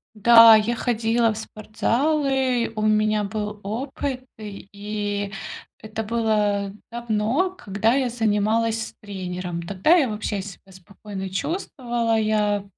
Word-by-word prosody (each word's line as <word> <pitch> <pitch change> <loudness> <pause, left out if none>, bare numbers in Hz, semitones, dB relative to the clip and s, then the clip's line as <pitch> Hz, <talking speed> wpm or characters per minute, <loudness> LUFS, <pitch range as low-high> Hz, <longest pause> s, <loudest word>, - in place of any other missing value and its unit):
Да, 230 +1 +8
я 220 +3 0
ходила 230 -1 +1
в - - -8
спортзалы, 255 +3 0
у 215 - -3
меня 215 0 +2
был 210 0 -4
опыт, 255 +4 -4
и 205 0 -5 0.5
это 220 +1 -5
было 210 -3 0 0.2
давно, 235 - -1
когда 215 - 0
я 265 -2 +1
занималась 225 0 0
с - - -13
тренером. 180 -3 -5
Тогда 195 - +2
я 280 -9 +3
вообще 210 -1 -3
себя 195 0 -11
спокойно 190 +1 -8
чувствовала, 235 - -2
я, 210 -2 +1
215 Hz, 115 wpm, -23 LUFS, 205-235 Hz, 0.5 s, Да